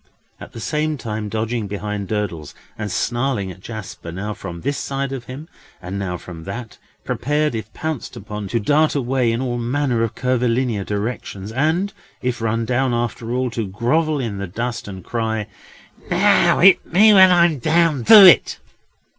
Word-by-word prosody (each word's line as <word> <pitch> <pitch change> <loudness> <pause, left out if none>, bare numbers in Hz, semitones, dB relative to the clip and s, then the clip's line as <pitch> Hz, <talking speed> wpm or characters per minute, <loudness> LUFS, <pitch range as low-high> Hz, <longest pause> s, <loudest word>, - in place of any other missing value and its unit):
At - - -11
the - - -8
same 150 +5 -1
time 110 -3 -5
dodging 110 0 -2
behind 105 0 -4
Durdles, 90 -8 -4 0.2
and 105 -2 -5
snarling 120 -3 -1
at 90 - -12
Jasper, 100 -5 -8
now 100 +5 -4
from 85 -4 -8
this 140 +2 -2
side 135 0 -3
of 130 -3 -6
him, 140 +5 -9 0.3
and 95 +2 -6
now 90 -2 -3
from 85 -2 -10
that: 110 +4 -7 0.2
prepared, 150 -1 -1
if 110 -1 -5
pounced 155 -6 -4
upon, 105 -2 -6
to 115 +3 -1
dart 150 +8 +2
away 130 -3 +1
in 115 +3 -2
all 120 -2 -2
manner 125 0 0
of 115 -1 -2
curvilinear 125 -3 0
directions, 105 -1 -4
and, 160 - 0 0.3
if 125 -2 -3
run 115 0 0
down 125 +1 0
after 120 0 -3
all, 125 0 -1
to 115 -2 -3
grovel 145 +10 0
in 110 -6 -4
the 100 - -4
dust, 120 +6 -4
and 95 -3 -8
cry: 110 -2 -2 0.6
"Now, - - +4
hit 190 +1 +7
me 210 +5 +5
when 190 -2 +8
I'm 170 -4 +3
down! 155 0 +2
Do 205 - +9
it!" 180 - +6
120 Hz, 170 wpm, -20 LUFS, 105-140 Hz, 0.6 s, Do